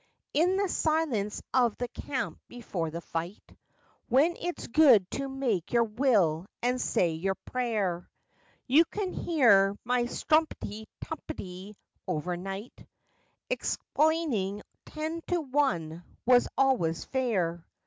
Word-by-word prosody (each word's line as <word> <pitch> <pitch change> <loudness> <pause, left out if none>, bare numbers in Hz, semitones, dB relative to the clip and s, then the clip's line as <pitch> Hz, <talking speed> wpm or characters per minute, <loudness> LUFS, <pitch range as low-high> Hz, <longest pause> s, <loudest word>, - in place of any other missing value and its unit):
In 355 +5 +3
the 400 0 +1
silence 310 - 0
of 240 -4 +3
the 245 - -2
camp 260 +1 -4
before 190 -9 -4
the 165 +2 -6
fight, 170 +4 -6 0.5
When 290 +8 +4
it's 350 0 -4
good 250 -7 +6
to 275 0 -3
make 245 -10 -2
your 235 -1 +5
will 210 - +2 0.2
and 250 +1 +1
say 175 -2 +1
your 190 +5 -1
prayer, 210 -10 -2 0.6
You 285 +6 +6
can 390 -1 -4
hear 205 - +4
my 245 0 +1
strumpty 240 -8 0
tumpty 205 - -7 0.3
overnight 180 +6 -4 0.7
Explaining 280 - 0 0.2
ten 315 +2 -4
to 355 - +1
one 255 - -1 0.2
was 245 0 +5
always 245 -12 +2
fair. 190 -11 -1
240 Hz, 115 wpm, -29 LUFS, 190-285 Hz, 0.7 s, good